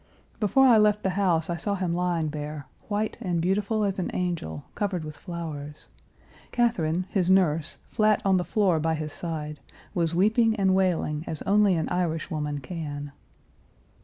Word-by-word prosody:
Before 230 Hz, +6 st, +4 dB
I 235 Hz, -4 st, +7 dB
left 210 Hz, 0 st, +3 dB
the 190 Hz, -, +1 dB
house 180 Hz, -4 st, +1 dB
I 170 Hz, -, -2 dB
saw 200 Hz, +4 st, -1 dB
him 180 Hz, -3 st, -1 dB
lying 175 Hz, -3 st, 0 dB
there, 150 Hz, -1 st, -5 dB, 0.2 s
white 210 Hz, +1 st, -1 dB
and 180 Hz, -6 st, -1 dB
beautiful 205 Hz, +5 st, +1 dB
as 195 Hz, -1 st, -1 dB
an 180 Hz, -, -1 dB
angel, 170 Hz, -, -3 dB
covered 190 Hz, -5 st, -2 dB
with 155 Hz, -1 st, -7 dB
flowers; 155 Hz, -5 st, -7 dB, 0.6 s
Catherine, 185 Hz, -8 st, +1 dB
his 185 Hz, -3 st, +1 dB
nurse, 165 Hz, -5 st, +2 dB
flat 215 Hz, -1 st, +2 dB
on 190 Hz, -1 st, +4 dB
the 180 Hz, -, 0 dB
floor 185 Hz, -2 st, +2 dB
by 160 Hz, +1 st, +1 dB
his 155 Hz, -1 st, -5 dB
side, 150 Hz, -3 st, -5 dB, 0.3 s
was 170 Hz, -3 st, 0 dB
weeping 220 Hz, +4 st, +3 dB
and 195 Hz, -3 st, +2 dB
wailing 175 Hz, -5 st, +1 dB
as 155 Hz, -, -4 dB
only 205 Hz, -2 st, +4 dB
an 160 Hz, -, -1 dB
Irishwoman 155 Hz, -4 st, -2 dB
can. 145 Hz, -2 st, -6 dB
175 Hz, 160 wpm, -26 LUFS, 155-200 Hz, 0.6 s, I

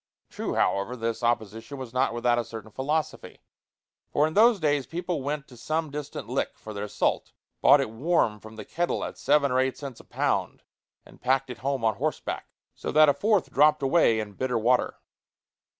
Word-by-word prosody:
True, -, -, -3 dB
however, 100 Hz, +5 st, +1 dB
this 115 Hz, -1 st, -3 dB
opposition 115 Hz, +2 st, -2 dB
was 130 Hz, -3 st, -8 dB
not 130 Hz, 0 st, +2 dB
without 120 Hz, 0 st, +1 dB
a -, -, 0 dB
certain 110 Hz, -1 st, -9 dB
philosophy; 150 Hz, +6 st, -3 dB, 0.7 s
for 145 Hz, -, +2 dB
in 155 Hz, -, -2 dB
those 220 Hz, +2 st, +5 dB
days 145 Hz, -4 st, +1 dB
people 175 Hz, -2 st, -3 dB
went 145 Hz, +1 st, -3 dB
to 125 Hz, -, -14 dB
some 155 Hz, +5 st, -2 dB
distant 145 Hz, 0 st, -6 dB
lick -, -, -2 dB
for 110 Hz, -, -9 dB
their 100 Hz, 0 st, -4 dB
salt, -, -, -1 dB, 0.3 s
bought 145 Hz, -, +7 dB
it 135 Hz, -5 st, -2 dB
warm 115 Hz, -4 st, +1 dB
from 110 Hz, +1 st, -12 dB
the 105 Hz, -2 st, -8 dB
kettle 175 Hz, +1 st, -1 dB
at -, -, -5 dB
seven 140 Hz, -1 st, +3 dB
or 130 Hz, -, +2 dB
eight 130 Hz, 0 st, 0 dB
cents 135 Hz, -5 st, -8 dB
a -, -, -13 dB
pound, -, -, -2 dB, 0.4 s
and -, -, -18 dB
packed 130 Hz, +1 st, +1 dB
it 125 Hz, -, -9 dB
home 135 Hz, -3 st, -1 dB
on 110 Hz, -3 st, +1 dB
horseback, -, -, -3 dB, 0.3 s
so -, -, -5 dB
that 155 Hz, 0 st, +6 dB
a -, -, +5 dB
fourth 210 Hz, 0 st, +1 dB
dropped 150 Hz, +1 st, +4 dB
away 135 Hz, -5 st, +4 dB
in 105 Hz, -1 st, -5 dB
bitter 125 Hz, +3 st, -1 dB
water. 120 Hz, +3 st, +2 dB
130 Hz, 195 wpm, -26 LUFS, 115-150 Hz, 0.7 s, bought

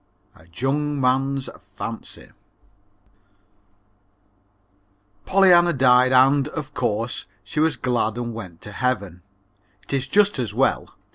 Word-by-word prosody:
A 80 Hz, -, -20 dB
Jung 145 Hz, -, -2 dB
Man's 135 Hz, +1 st, 0 dB, 0.3 s
Fancy -, -, -8 dB, 3.0 s
Pollyanna 175 Hz, -3 st, +5 dB
died 130 Hz, -1 st, +4 dB
and, 135 Hz, +2 st, +4 dB
of 150 Hz, -1 st, -7 dB
course, 115 Hz, -3 st, -2 dB, 0.2 s
she 150 Hz, -, -5 dB
was 160 Hz, 0 st, +1 dB
glad 120 Hz, -3 st, -1 dB
and 120 Hz, -1 st, -4 dB
went 95 Hz, -7 st, -9 dB
to 105 Hz, -, -9 dB
Heaven. 100 Hz, -6 st, -2 dB, 0.6 s
It -, -, -7 dB
is 135 Hz, -1 st, -1 dB
just 205 Hz, +1 st, +2 dB
as 110 Hz, -5 st, -3 dB
well. 135 Hz, +3 st, 0 dB
130 Hz, 115 wpm, -22 LUFS, 120-145 Hz, 3.0 s, Pollyanna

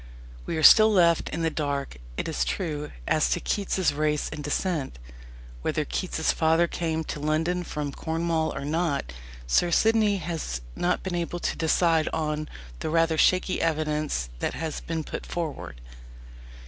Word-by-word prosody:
We -, -, -2 dB
are 155 Hz, -, -1 dB
still 220 Hz, +4 st, +9 dB
left 170 Hz, -4 st, +3 dB
in 165 Hz, +1 st, -3 dB
the 165 Hz, -, +1 dB
dark, 140 Hz, -, -3 dB, 0.2 s
it -, -, -2 dB
is 60 Hz, -, 0 dB
true, 150 Hz, -, -3 dB, 0.2 s
as -, -, +2 dB
to -, -, +1 dB
Keats's 190 Hz, -5 st, 0 dB
race 150 Hz, 0 st, 0 dB
and 150 Hz, -, -6 dB
descent. 145 Hz, -, -2 dB, 0.6 s
Whether -, -, -1 dB
Keats's 65 Hz, +1 st, -1 dB
father 160 Hz, +2 st, +3 dB
came 160 Hz, -2 st, -2 dB
to 150 Hz, -, -5 dB
London 160 Hz, +4 st, 0 dB
from 150 Hz, -3 st, -4 dB
Cornwall 160 Hz, +1 st, -1 dB
or 140 Hz, -, -4 dB
not, 150 Hz, -, -1 dB, 0.3 s
Sir 115 Hz, -, +3 dB
Sidney 215 Hz, +2 st, +3 dB
has 160 Hz, -, -4 dB
not 180 Hz, +1 st, 0 dB
been 190 Hz, -, -3 dB
able 175 Hz, 0 st, -2 dB
to -, -, -1 dB
decide 165 Hz, 0 st, +2 dB
on 155 Hz, -1 st, -2 dB, 0.3 s
the -, -, -3 dB
rather 165 Hz, 0 st, +2 dB
shaky 185 Hz, +3 st, +2 dB
evidence 150 Hz, -, -1 dB
that -, -, -2 dB
has 160 Hz, -1 st, -4 dB
been 165 Hz, -1 st, -3 dB
put -, -, -6 dB
forward. 160 Hz, -, -5 dB
160 Hz, 160 wpm, -26 LUFS, 150-170 Hz, 0.6 s, still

